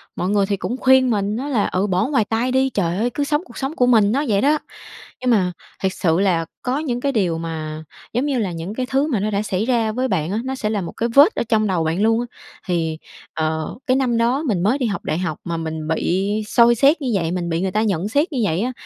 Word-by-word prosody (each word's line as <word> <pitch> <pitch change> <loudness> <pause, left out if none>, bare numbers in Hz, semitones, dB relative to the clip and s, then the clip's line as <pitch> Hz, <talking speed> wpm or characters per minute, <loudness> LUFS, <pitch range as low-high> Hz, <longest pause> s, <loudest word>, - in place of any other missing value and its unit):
mọi 180 - -2
người 205 -1 +2
thì 200 0 -1
cũng 200 +7 -3
khuyên 260 -1 +4
mình 205 0 0
á 275 +3 -4
là 235 -8 +1
"Ừ, 190 +3 0
bỏ 185 +4 +1
ngoài 265 -7 +1
tai 230 +4 -1
đi, 265 +1 +2
trời 180 -6 -1
ơi, 235 +3 +1
cứ 290 - -1
sống 295 +2 0
cuộc - - -13
sống 270 +3 -3
của 250 - +3
mình" 220 -4 +4
nó 280 +4 +1
vậy 200 -3 +2
đó. 295 +2 +3 0.6
Nhưng 255 - 0
mà 185 -5 +2 0.3
thiệt 190 -1 +1
sự 165 -1 +1
là 180 -4 +2 0.2
có 250 +2 -1
những 245 -6 -2
cái 280 +1 0
điều 180 -9 0
mà, 155 -1 -5 0.3
giống 245 +4 0
như 275 -4 0
là, 200 -5 -1
những 170 +4 -5
cái 255 +1 -2
thứ 275 +3 +1
mà 250 -9 0
nó 210 +2 -1
đã 200 +1 0
xảy 200 0 -1
ra 230 -3 +1
với 255 +3 -1
bạn 180 -6 -1
á, 215 - -1
nó 265 0 -3
sẽ 215 -4 -2
là 210 -2 -1
một 170 - -5
cái 235 +1 -2
vết 285 - +6
ở - - 0
trong 215 -2 +2
đầu 180 -4 0
bạn 165 +4 -1
luôn 225 +1 +3
á 240 - -2 0.4
thì, 165 -3 -1 0.4
ờ, 160 0 -2
cái 255 +1 +3
năm 245 -3 +1
đó 245 +6 +1
mình 185 -6 0
mới 225 +8 +2
đi 260 - -1
học 205 -3 -3
đại 155 - -1
học 170 -4 -2
mà 170 -1 -3
mình 160 -1 -4
bị 185 +5 0 0.2
soi 235 +1 +5
xét 285 +7 +4
như 255 -4 -1
vậy, 170 -4 0
mình 175 -1 -2
bị 165 +2 -1
người 190 - -1
ta 215 +2 +1
nhận 200 -2 0
xét 300 - +1
như 270 - -2
vậy 170 +1 0
á 250 - -1
215 Hz, 275 wpm, -20 LUFS, 180-255 Hz, 0.6 s, vết